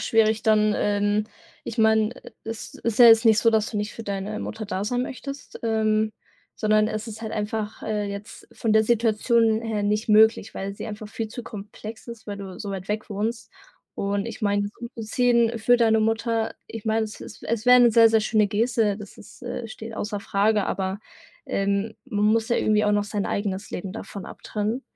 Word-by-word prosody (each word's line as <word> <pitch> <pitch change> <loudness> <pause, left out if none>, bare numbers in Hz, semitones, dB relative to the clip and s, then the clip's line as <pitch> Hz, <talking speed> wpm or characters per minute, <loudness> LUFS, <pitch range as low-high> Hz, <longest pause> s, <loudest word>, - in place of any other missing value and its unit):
schwierig 220 -1 +2
dann, 215 -1 +4
ähm 205 +1 +1 0.4
ich - - -6
meine, 220 0 +3 0.3
es 225 0 -6
ist 230 -2 -3
ja 245 - +9
jetzt 225 +1 +7
nicht 220 -1 +6
so, 230 - +4
dass 220 -1 +2
du 220 - -4
nicht 210 +1 -2
für 230 - -8
deine 200 0 -4
Mutter 220 0 -5
da 195 -2 -3
sein 245 +4 -1
möchtest, 275 +2 -7
ähm, 220 -1 +1 0.4
sondern 215 0 +2
es 215 +1 -4
ist 220 0 -8
halt 220 -1 -5
einfach, 210 0 -3
äh, 210 -1 -1
jetzt 200 +2 -9
von 225 - -1
der 220 0 +5
Situation 225 0 +2
her 225 -2 -2
nicht 210 +2 0
möglich, 220 0 +4
weil 195 +1 -4
sie - - -7
einfach 215 0 -7
viel 220 +1 -4
zu 240 +2 -7
komplex 215 +1 -9
ist, 235 -1 -9
weil 205 -1 -5
du 190 -2 -8
so 205 - -5
weit 195 -1 -6
weg 215 +1 -3
wohnst. 220 +2 -3 0.4
Und 200 0 -1
ich 230 - -7
meine, 205 -1 +1
umzuziehen 235 0 +1
für 245 +3 +4
deine 225 -2 +3
Mutter 225 0 0
ich 225 -1 -8
meine, 220 0 +2
es 215 - -9
ist - - -11
es 230 +1 -2
wäre 250 0 +8
'ne 240 - +6
sehr, 230 0 +7
sehr 225 0 +3
schöne 215 0 +2
Geste. 220 -1 +1
Das 210 0 -11
ist, - - -15
äh 230 - -5
steht 225 +1 -8
außer 210 -1 -3
Frage. 205 +1 +1
Aber, 190 +1 -2 0.5
ähm, 200 +2 -1
man 210 -5 0
muss 220 +1 +2
ja 235 - +2
irgendwie 215 0 +2
auch 210 - +3
noch 205 0 +2
sein 205 -1 -2
eigenes 200 0 -2
Leben 185 +1 -5
davon 200 -3 -7
abtrennen. 215 +4 -4
215 Hz, 200 wpm, -24 LUFS, 205-225 Hz, 0.5 s, ja